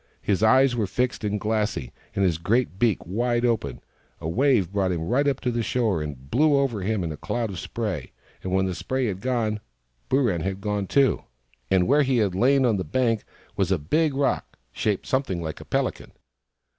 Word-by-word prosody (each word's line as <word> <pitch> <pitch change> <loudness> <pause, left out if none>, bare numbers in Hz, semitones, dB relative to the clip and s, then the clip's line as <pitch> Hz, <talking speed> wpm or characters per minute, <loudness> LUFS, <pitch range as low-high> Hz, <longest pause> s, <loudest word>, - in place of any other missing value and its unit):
His 100 -1 +1
eyes 130 +3 +5
were 110 -4 0
fixed 125 +5 -1
and 105 0 -1
glassy, 105 - -1 0.2
and 100 - +2
his 85 -3 +1
great 110 +1 0
beak 115 -4 +3
wide 120 +6 0
open. 90 - -1 0.4
A - - -5
wave 115 - +2
brought 95 -2 +1
him 85 -2 -2
right 140 +4 +2
up 140 -2 -1
on 125 - +1
the 120 - 0
shore, 110 -7 0
and 70 -3 -7
blew 150 +3 +4
over 130 -7 0
him 100 0 -1
in 80 - -3
a 75 - -6
cloud 115 - -2
of 95 - -6
spray. - - -4 0.3
When 95 0 0
the 95 - -1
spray 130 +8 -2
had 95 -4 -3
gone, 115 -4 0 0.5
Booran 120 - +2
had 95 +2 -3
gone, 105 -1 -2
too; 140 +3 +2 0.4
and 95 -2 +3
where 145 +3 +5
he 135 -2 +2
had 105 -5 +2
lain 130 +7 +3
on 115 -4 +2
the 95 - -2
bank 115 +6 0 0.3
was - - 0
a - - +3
big 150 - +1
rock, 140 0 -1
shaped 105 - -1
something 130 -10 -1
like 80 -2 -5
a - - -11
pelican. - - -2
110 Hz, 200 wpm, -25 LUFS, 95-125 Hz, 0.5 s, eyes